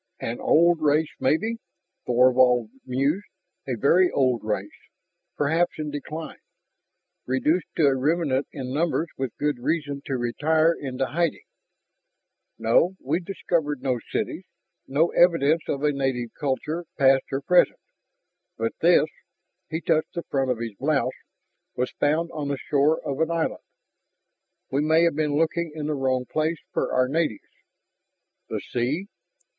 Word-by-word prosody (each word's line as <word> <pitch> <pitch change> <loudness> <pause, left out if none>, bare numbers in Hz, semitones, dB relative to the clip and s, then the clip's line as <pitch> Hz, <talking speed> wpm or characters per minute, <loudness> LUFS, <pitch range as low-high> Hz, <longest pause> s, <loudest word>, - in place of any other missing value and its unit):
"An 115 +1 -4
old 170 0 +4
race, 150 +1 +2
maybe," 220 +12 +1 0.5
Thorvald 125 -2 +4 0.2
mused, 140 +10 0 0.4
"a 125 -3 -2
very 175 - +4
old 130 -4 +1
race, 105 -2 -4 0.6
perhaps 165 +4 +1
in 150 -1 -4
decline, 155 +2 -6 0.9
reduced 150 +7 +1
to 160 - +3
a 135 -1 +4
remnant 145 0 0
in 130 -2 -5
numbers 165 +2 0
with 130 -3 -4
good 145 -3 -1
reason 145 0 -2
to 135 -4 -2
retire 155 +7 +2
into 135 -4 -3
hiding. 170 +3 -1 1.1
No, 145 +11 +3
we've 175 - -1
discovered 160 -7 -2
no 130 -3 0
cities, - - -2 0.4
no 155 +5 +2
evidence 165 -2 +4
of 140 0 -2
a 150 - +3
native 130 -4 -2
culture 150 +5 -2
past 135 -1 +4
or 135 +1 -1
present. 180 - +3 0.8
But - - -1
this - - +5 0.3
" - - -54
he 160 +1 -3
touched 160 -2 0
the 170 - -3
front 135 -2 -1
of 125 - +1
his 115 -1 -5
blouse 145 +1 +1 0.6
"was 125 +1 -1
found 160 +3 +1
on 150 -2 -3
the 140 -1 -1
shore 145 +3 +2
of 140 -1 -3
an 160 - +1
island. 165 -1 -1 1.1
We 135 +2 +1
may 160 +2 +4
have 170 -3 +2
been 150 -1 0
looking 165 +1 0
in 155 -2 -4
the 150 - -1
wrong 130 -2 0
place 155 +5 -1
for - - -1
our 130 0 +2
natives." 150 -5 -2 1.0
"The - - -3
sea...." 135 +10 -2
145 Hz, 145 wpm, -25 LUFS, 130-160 Hz, 1.1 s, this